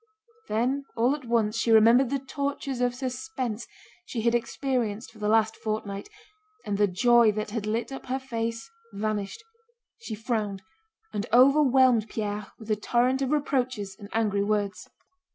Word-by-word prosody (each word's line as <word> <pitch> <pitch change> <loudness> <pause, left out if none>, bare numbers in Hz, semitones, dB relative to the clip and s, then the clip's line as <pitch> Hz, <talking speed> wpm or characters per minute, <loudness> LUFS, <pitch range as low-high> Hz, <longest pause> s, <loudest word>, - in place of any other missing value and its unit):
Then 255 +6 0
all 240 +4 +3
at 290 -3 -10
once 230 -2 +1
she 230 - 0
remembered 230 +4 +6
the 275 - 0
tortures 275 -1 -3
of 245 0 +1
suspense 255 -3 -4 0.4
she 240 -10 -4
had 235 +1 +2
experienced 240 -2 -1
for 220 - -17
the 210 - -1
last 220 0 +3
fortnight, 215 - -4 0.6
and 205 -1 -2
the 205 - +5
joy 235 +4 +4
that 215 0 -4
had 215 -2 -3
lit 230 +5 -2
up 270 - -8
her 260 +1 -1
face 230 -3 -4 0.3
vanished; 210 - -3 0.6
she 230 - -6
frowned 210 -3 -2 0.5
and 205 +2 -2
overwhelmed 260 -3 +5
Pierre 210 -2 -3
with 220 -1 -7
a - - +4
torrent 245 +5 +1
of 270 - 0
reproaches 255 -9 -1
and 200 -1 -10
angry 210 -3 +1
words. 205 -1 -2
230 Hz, 155 wpm, -27 LUFS, 215-255 Hz, 0.6 s, remembered